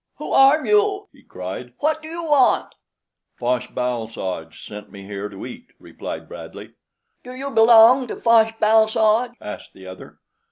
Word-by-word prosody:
"Who - - -8
are 275 +3 +5
you?" 415 -1 +1
he 275 - -21
cried. 95 +7 -8
"What 310 +1 -1
do 310 - -10
you 335 +1 -7
want?" 290 -5 +2 0.6
"Fosh 125 0 -1
bal 125 -3 -3
soj 90 -7 -6
sent 105 0 -10
me 100 -1 -11
here 100 +1 -6
to 100 +2 -9
eat," 185 - -11
replied - - -9
Bradley. - - -11 0.5
"Do 250 +1 -10
you 275 +2 -6
belong 235 +2 +6
to - - -6
Fosh 225 -1 +3
bal 220 0 +4
soj?" 220 +3 +1
asked 105 - -9
the 95 - -15
other. 95 0 -12
220 Hz, 165 wpm, -21 LUFS, -, 0.6 s, belong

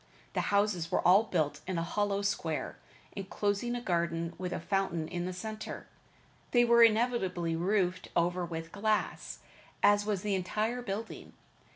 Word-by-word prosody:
The - - +1
houses 200 -5 +1
were - - +2
all 195 +5 +6
built 150 -6 -1
in 185 -2 -2
a 165 - 0
hollow 200 +3 -1
square, 160 -9 -2 0.4
enclosing 205 +4 -1
a 240 - -3
garden 170 -4 -1
with 185 -1 -3
a - - -2
fountain 170 -3 -1
in 175 +1 -3
the - - -3
center. 215 +4 -6 0.6
These 240 -1 +4
were 235 0 +6
invariably 215 -7 +3
roofed 185 +1 0
over 175 +1 +1
with 165 -1 -5
glass, 215 +1 -1 0.4
as 205 0 +5
was 205 -3 -2
the 205 -1 0
entire 215 +6 -1
building. 220 0 -6
195 Hz, 155 wpm, -31 LUFS, 170-215 Hz, 0.6 s, all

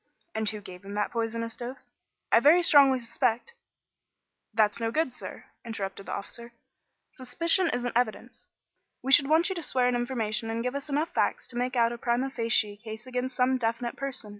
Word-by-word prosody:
"And 220 -1 0
who 215 -1 -6
gave 185 -1 -11
him 200 +1 -8
that 210 - -1
poisonous 230 0 -3
dose?" 245 +2 -8 0.4
"I - - +7
very 315 +8 +6
strongly 275 -5 +6
suspect 235 - -1 0.5
" - - -56
"That's 215 0 +3
no 225 -1 0
good, 305 +1 0
sir," - - -8 0.2
interrupted 200 -4 -6
the - - -5
officer. 235 +4 -7 0.6
"Suspicion 335 +8 +1
isn't 245 -3 -2
evidence. 240 -3 -2 0.6
We 265 - -2
should 275 0 +7
want 325 +4 +4
you - - -1
to 345 - -5
swear 255 -5 +1
an 250 - +1
information 230 -3 -2
and 230 +1 -2
give 250 +1 -2
us 280 +1 -5
enough 295 +4 0
facts - - 0
to 245 - -9
make 250 +1 -1
out 235 -1 +3
a 235 - -8
primâ 250 +3 -1
facie 225 -3 +1
case 220 +1 -9
against 255 0 -3
some 255 +1 +2
definite 235 +1 -2
person. 265 -5 -4
240 Hz, 190 wpm, -28 LUFS, 225-265 Hz, 0.6 s, I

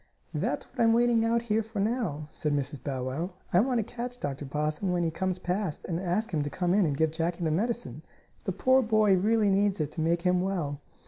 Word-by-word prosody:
"That's - - -1
what 265 - -15
I'm 230 -1 +5
waiting 235 -1 +3
out 230 +1 +2
here 220 -1 +1
for 220 -1 -6
now," 195 - -1
said 150 -1 -2
Mrs. 140 0 -2
Bow 135 -3 -3
Wow. 160 +9 -3 0.2
"I 175 - +6
want 250 +3 +2
to 225 - +2
catch 245 +3 -6
Dr. 145 0 -4
Possum 150 +6 -1
when 175 -1 +1
he 165 - 0
comes 185 +2 -1
past, 180 -2 -2
and 170 -1 -2
ask 185 +3 -1
him 155 - +1
to 145 - -2
come 180 +3 0
in 200 -3 +4
and 140 -2 -1
give 160 0 +2
Jackie 170 +2 -2
the 160 - +1
medicine. 235 +8 -1 0.4
The - - 0
poor 260 +1 +4
boy 215 -3 +4
really 210 +2 +3
needs 200 0 +2
it 150 -2 -1
to 160 - -4
make 170 +2 +1
him 180 -1 +3
well." 170 -7 -2
185 Hz, 235 wpm, -28 LUFS, 155-220 Hz, 0.4 s, I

